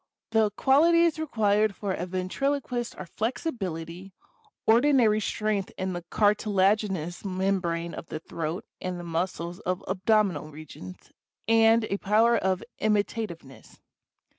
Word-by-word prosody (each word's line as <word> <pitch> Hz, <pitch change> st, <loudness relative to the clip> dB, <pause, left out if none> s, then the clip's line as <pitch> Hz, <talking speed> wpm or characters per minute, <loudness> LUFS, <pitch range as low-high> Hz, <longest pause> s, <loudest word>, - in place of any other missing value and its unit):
The 220 Hz, -1 st, +3 dB
qualities 330 Hz, +4 st, +4 dB
required 215 Hz, -8 st, +1 dB
for 200 Hz, -2 st, -3 dB
a 180 Hz, 0 st, -4 dB
ventriloquist 240 Hz, +7 st, -2 dB
are 185 Hz, -, -6 dB
flexibility, 190 Hz, -, -4 dB, 0.5 s
ordi 250 Hz, +6 st, +5 dB
nary 215 Hz, -4 st, +4 dB
strength 215 Hz, -2 st, -1 dB
in 185 Hz, 0 st, -2 dB
the 175 Hz, -, -4 dB
cartilaginous 200 Hz, -4 st, +1 dB
membrane 185 Hz, -3 st, -1 dB
of -, -, -8 dB
the 155 Hz, -, -5 dB
throat 165 Hz, +3 st, -5 dB, 0.2 s
and 180 Hz, -1 st, -4 dB
the -, -, -7 dB
muscles 170 Hz, 0 st, -3 dB
of 185 Hz, 0 st, -3 dB
abdominal 190 Hz, -5 st, +1 dB
regions, 145 Hz, -12 st, -11 dB, 0.4 s
and 225 Hz, 0 st, +5 dB
a 200 Hz, -2 st, -2 dB
power 225 Hz, +4 st, +3 dB
of 190 Hz, -4 st, 0 dB, 0.2 s
imitativeness. 205 Hz, -, -2 dB
200 Hz, 120 wpm, -27 LUFS, 175-225 Hz, 0.5 s, ordi